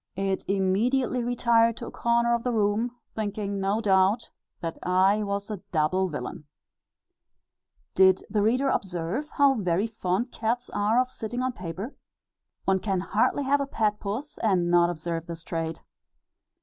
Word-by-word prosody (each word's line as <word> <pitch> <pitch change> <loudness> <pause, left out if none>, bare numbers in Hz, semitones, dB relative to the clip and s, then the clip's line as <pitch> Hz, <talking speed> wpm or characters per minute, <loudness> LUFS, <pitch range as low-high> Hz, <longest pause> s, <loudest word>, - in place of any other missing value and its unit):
It 195 0 -1
immediately 230 +7 +1
retired 230 -1 +3
to 235 - -6
a - - -7
corner 235 0 +2
of 235 - +1
the 250 - 0
room, 215 +1 +1 0.2
thinking 205 -2 -3
no 195 +3 +1
doubt 195 +2 +2 0.3
that 165 -1 -5
I 190 +3 +3
was 200 0 -3
a 205 -4 -5
double 180 +4 +2
villain." 150 -1 -6 1.5
Did 190 0 +5
the 210 0 0
reader 245 +6 +2
ever - - +3
observe 185 - -4
how 280 -2 +5
very 195 -4 0
fond 220 +1 -2
cats 240 +2 -2
are 210 +4 +2
of 255 0 0
sitting 240 +3 -4
on 255 0 -1
paper. 185 - -6 0.7
One 190 0 +3
can 190 -2 -1
hardly 215 +8 +1
have 280 +1 +2
a 280 - -2
pet 210 -5 0
puss, 225 +9 -5
and 180 -5 +2
not 175 0 +5
observe 165 0 -4
this 165 -1 -7
trait. 165 -1 -4
205 Hz, 160 wpm, -26 LUFS, 185-235 Hz, 1.5 s, Did